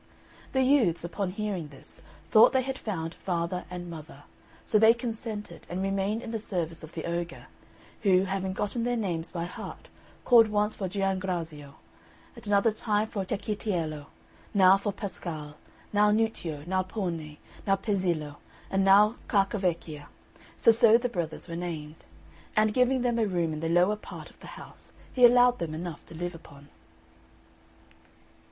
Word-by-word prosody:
The 265 -1 +3
youths, 235 - +3
upon 180 +2 -2
hearing 195 -4 -3
this, 140 -2 -12 0.3
thought 215 - +7
they 260 -1 +3
had 265 0 -4
found 165 -6 -4
father 175 0 -3
and 180 -1 -6
mother; 155 -3 -10 0.4
so 215 - +3
they 225 +2 +7
consented, 220 -6 -6
and 185 +2 -3
remained 195 +4 -1
in 225 - -6
the 225 - -2
service 170 -7 -4
of 155 - -10
the 160 - -5
ogre, 170 0 -4 0.6
who, 190 -2 +4
having 190 0 -2
gotten 205 +5 -2
their 245 +1 0
names 175 -7 -2
by 170 -1 -3
heart, 175 - -9 0.4
called 235 -3 +7
once 210 0 +1
for 190 -2 -3
Giangrazio, 180 -7 -3 0.6
at - - -11
another 205 +2 +4
time 215 0 0
for 200 - -3
Cecchitiello, 185 -7 -3 0.5
now 190 -1 +7
for 200 +1 -2
Pascale, 165 -7 -6 0.4
now 210 0 +5
Nuccio, 210 -9 -1
now 185 +2 +1
Pone, 170 -6 -4 0.3
now 195 - +4
Pezzillo, 180 -8 -1 0.3
and 195 0 +2
now 205 +4 +6
Carcavecchia, 180 -7 0 0.5
for 230 - +6
so 230 0 +6
the 245 +1 -2
brothers 170 -7 -4
were 170 - -5
named; 160 -3 -6 0.5
and 215 0 +3
giving 250 +1 +2
them 240 -1 +1
a 220 - +2
room 170 -4 0
in 155 - -4
the 165 +1 -2
lower 180 +5 +4
part - - -10
of - - -26
the - - -12
house, - - -13 0.2
he 250 - +1
allowed 245 0 +5
them 160 -2 -3
enough 170 -1 -6
to - - -11
live 175 +2 -4
upon. 145 -3 -14
190 Hz, 160 wpm, -28 LUFS, 170-215 Hz, 0.6 s, thought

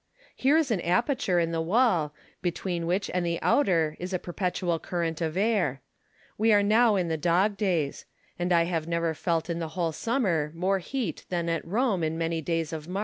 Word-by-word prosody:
Here 280 +4 +3
is 310 -6 +1
an 195 -6 +1
aperture 185 - +1
in 165 -1 0
the 165 -1 -1
wall, 180 - +2 0.3
between 175 -1 -2
which 185 +3 0
and 180 -1 0
the 170 -1 -1
outer 165 - +2
is 180 +2 -5
a - - +2
perpetual 175 -1 -2
current 170 -2 -3
of 160 +1 -2
air. 190 - +1 0.6
We 225 +1 +4
are 205 -1 +5
now 220 +1 +4
in 180 -3 0
the 160 -1 -1
dog 180 +6 +2
days; 175 -9 -1 0.3
and 175 +1 -1
I 170 -1 +5
have 165 -2 -2
never 170 -1 0
felt 165 +1 -1
in 170 -1 -2
the 165 - -3
whole 170 -2 +1
summer 175 - 0
more 190 +3 +1
heat 215 - -4
than 170 -2 -1
at 165 -1 -1
Rome 205 -1 0
in 160 +1 -1
many 165 0 -1
days 165 0 -2
of 155 -1 -6
March. 185 +2 -3
175 Hz, 205 wpm, -27 LUFS, 165-200 Hz, 0.6 s, are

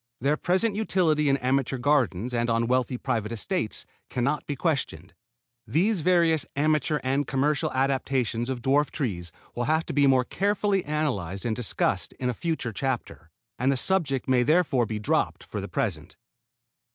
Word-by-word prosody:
Their 140 +4 +2
present 190 +7 +1
utility 165 -8 +2
in 135 - +3
amateur 135 0 0
gardens 125 -5 +1
and 120 0 0
on 115 0 +2
wealthy 125 +1 0
private 110 -2 -2
estates 115 - -2 0.2
can 125 - -2
not 140 +4 -1
be 145 - -2
questioned. 130 - -2 0.5
These 180 - +1
various 165 -3 +3
amateur 150 +1 +1
and 135 +2 0
commercial 140 +2 0
adaptations 130 -3 0
of 125 -3 -4
dwarf 140 +3 +3
trees 90 - -3 0.2
will 120 - -2
have 160 +3 +1
to - - -5
be 140 0 +4
more 130 -2 +4
carefully 200 +1 0
analyzed 125 - -2
and 115 -2 0
discussed 120 -3 0
in 125 -1 -2
a - - -5
future 155 -5 -3
chapter, 120 -8 -3 0.3
and 130 +3 +2
the 135 - 0
subject 140 -6 0
may 130 -1 +3
therefore 140 -4 +2
be 110 - -3
dropped 105 - 0
for 105 - -5
the 100 - -5
present. 85 -5 -3
135 Hz, 165 wpm, -26 LUFS, 120-155 Hz, 0.5 s, be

